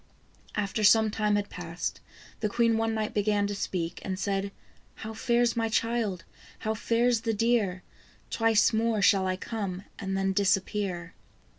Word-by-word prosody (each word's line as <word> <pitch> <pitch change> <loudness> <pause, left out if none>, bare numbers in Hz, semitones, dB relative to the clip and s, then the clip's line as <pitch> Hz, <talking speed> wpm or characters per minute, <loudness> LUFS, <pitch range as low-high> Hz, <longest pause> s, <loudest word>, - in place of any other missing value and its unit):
After 210 +1 -1
some 220 +1 +6
time 210 -1 +1
had 205 0 -2
passed, 175 -1 -4 0.4
the 215 - 0
queen 230 +1 +2
one 225 0 0
night 215 -1 -2
began 205 0 +1
to 205 - -2
speak, 175 -4 -3
and 190 -1 -3
said: 200 0 -1 0.2
" - - -33
How 220 0 -5
fares 235 +1 +1
my 225 -1 0
child? 220 -5 0 0.3
how 220 - -2
fares 230 +1 +1
the 225 -1 -1
deer? 205 -5 +1 0.5
Twice 225 -1 +3
more 220 -2 +1
shall 195 -2 +4
I 185 - 0
come, 195 -2 -4 0.2
and 195 0 -2
then 195 0 +1
disappear." 190 -2 0
210 Hz, 160 wpm, -28 LUFS, 195-225 Hz, 0.5 s, some